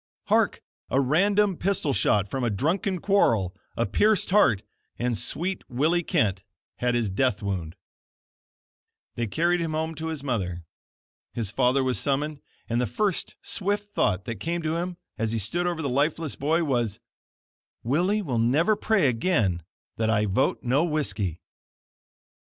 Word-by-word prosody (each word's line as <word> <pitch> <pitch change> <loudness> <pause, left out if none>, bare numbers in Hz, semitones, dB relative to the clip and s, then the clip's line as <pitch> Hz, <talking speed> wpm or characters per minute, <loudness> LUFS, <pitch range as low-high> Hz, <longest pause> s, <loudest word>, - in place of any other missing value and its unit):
Hark! - - +2 0.3
a 135 - +2
random 195 +7 +3
pistol 180 -7 0
shot 105 -5 +2
from 130 +5 -3
a 120 - +2
drunken 170 - 0
quarrel, 115 - +2 0.2
a - - +2
pierced 205 - +2
heart, 140 - +4 0.3
and 120 -1 0
sweet 175 - -3
Willie 155 +8 +2
Kent 100 - 0 0.3
had 125 -1 +1
his 115 -5 0
death 110 0 +1
wound 90 -4 -3 1.4
They 120 -1 -2
carried 170 - +1
him 165 -2 -2
home 160 +1 -1
to 160 +1 -5
his 160 -4 -4
mother. 95 -10 -2 0.7
His 110 -5 -2
father 130 +2 +2
was 130 -1 0
summoned, 145 +1 -1 0.3
and 120 +1 0
the 125 - 0
first 205 - -1
swift 205 +1 -2
thought 95 -1 +1
that 115 -2 -5
came 170 +1 -2
to 160 0 0
him, 175 +1 -3 0.2
as 115 0 0
he - - 0
stood 170 - 0
over 170 -2 -2
the - - 0
lifeless 145 +3 0
boy, 160 +4 +1
was: 120 -8 0 0.8
"Willie 180 - +1
will 125 -9 -1
never 150 - +3
pray 205 -6 +2
again 115 - +1 0.4
that 110 0 +1
I 105 -1 +2
vote 105 +6 +1
No 135 +5 +2
Whiskey." 140 - -1
140 Hz, 155 wpm, -26 LUFS, 115-175 Hz, 1.4 s, heart